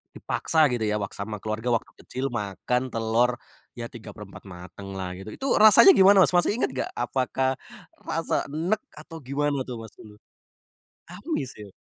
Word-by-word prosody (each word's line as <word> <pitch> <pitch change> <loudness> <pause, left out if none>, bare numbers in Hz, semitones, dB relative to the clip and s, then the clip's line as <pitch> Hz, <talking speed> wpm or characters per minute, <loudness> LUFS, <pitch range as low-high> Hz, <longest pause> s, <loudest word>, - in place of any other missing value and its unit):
dipaksa 160 -2 +3
gitu 120 -2 -2
ya 105 - -1
wak 100 -2 -4
sama 105 0 -5
keluarga 110 +2 -4
waktu 115 - -5
kecil 130 0 -5
makan 120 +4 -3
telur 115 +1 0 0.4
ya 120 -1 -7
tiga 110 -3 -11
perempat 105 -2 -12
mateng 95 +2 -11
lah 95 -1 -5
gitu, 95 - -11
itu 270 - -5
rasanya 220 - +9
gimana, 195 - +6
Mas, - - +5
masih 175 +4 +2
inget 240 - -1
nggak? 130 - -4
Apakah 130 +2 -2 0.5
rasa - - -1
enek 170 +9 -2 0.2
atau 160 +2 -11
gimana 140 0 -2
tuh, 125 - -6
Mas, 110 -2 -11
dulu? 105 -1 -14 0.9
Amis, 180 - -5
ya? 105 -2 -12
125 Hz, 165 wpm, -24 LUFS, 105-150 Hz, 0.9 s, rasanya